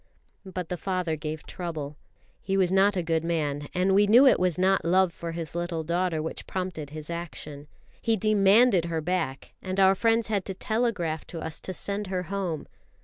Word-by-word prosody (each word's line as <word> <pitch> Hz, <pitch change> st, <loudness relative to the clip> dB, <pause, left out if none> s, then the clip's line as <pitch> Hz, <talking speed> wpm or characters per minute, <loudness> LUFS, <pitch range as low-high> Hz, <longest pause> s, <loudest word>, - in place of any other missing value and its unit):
But 180 Hz, -2 st, -5 dB
the 180 Hz, -, -3 dB
father 180 Hz, -3 st, -1 dB
gave 155 Hz, 0 st, -6 dB
trouble. 155 Hz, -5 st, -5 dB, 0.5 s
He 195 Hz, 0 st, -1 dB
was 185 Hz, -2 st, +2 dB
not 195 Hz, +1 st, +4 dB
a 180 Hz, -, 0 dB
good 165 Hz, -1 st, 0 dB
man, 150 Hz, -4 st, -1 dB
and 185 Hz, +1 st, +1 dB
we 205 Hz, +1 st, +5 dB
knew 240 Hz, +6 st, +7 dB
it 265 Hz, -, +6 dB
was 180 Hz, -3 st, +1 dB
not 190 Hz, 0 st, +3 dB
love 180 Hz, +1 st, +3 dB
for 170 Hz, 0 st, -6 dB
his 165 Hz, -2 st, -5 dB
little 170 Hz, -1 st, -2 dB
daughter 170 Hz, -1 st, 0 dB
which 160 Hz, -, -6 dB
prompted 180 Hz, -6 st, -4 dB
his 155 Hz, +2 st, -7 dB
action. 150 Hz, -4 st, -7 dB, 0.3 s
He 225 Hz, -1 st, +1 dB
demanded 205 Hz, -1 st, +4 dB
her 165 Hz, -1 st, -2 dB
back, 160 Hz, -5 st, -3 dB
and 185 Hz, +1 st, -3 dB
our 190 Hz, 0 st, +6 dB
friends 225 Hz, +3 st, +2 dB
had 205 Hz, -3 st, 0 dB
to 190 Hz, -, -5 dB
telegraph 200 Hz, -8 st, -1 dB
to 165 Hz, -, -7 dB
us 160 Hz, -1 st, -5 dB
to -, -, -4 dB
send 200 Hz, +2 st, -2 dB
her 185 Hz, -1 st, -2 dB
home. 180 Hz, -6 st, -3 dB
180 Hz, 195 wpm, -27 LUFS, 160-195 Hz, 0.5 s, knew